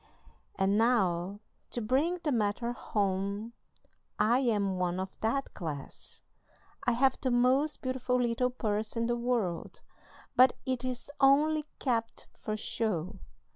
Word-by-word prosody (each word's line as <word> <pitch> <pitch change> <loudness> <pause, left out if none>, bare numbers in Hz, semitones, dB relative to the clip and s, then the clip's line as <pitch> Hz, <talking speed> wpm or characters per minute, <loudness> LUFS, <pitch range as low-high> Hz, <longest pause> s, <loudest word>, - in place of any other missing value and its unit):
And 195 +2 +2
now, 200 -4 +1 0.3
to - - -3
bring 270 +10 +1
the 300 - +1
matter 230 0 0
home, 200 +1 -2 0.6
I 235 +4 +4
am 205 -7 +1
one 180 0 0
of 190 0 -5
that 270 +5 -1
class. 150 -5 -7 0.6
I 245 - +4
have 265 +2 +3
the 260 - +1
most 255 +5 +2
beautiful 255 -1 0
little 245 +1 +1
purse 215 -3 -2
in 230 - +1
the 240 +1 +1
world, 235 -8 -2 0.5
but 255 0 +7
it 255 -1 -1
is 255 +2 -4
only 300 +3 +4
kept 230 -4 -1
for 215 0 -4
show. 210 -6 -2
235 Hz, 135 wpm, -30 LUFS, 205-255 Hz, 0.6 s, but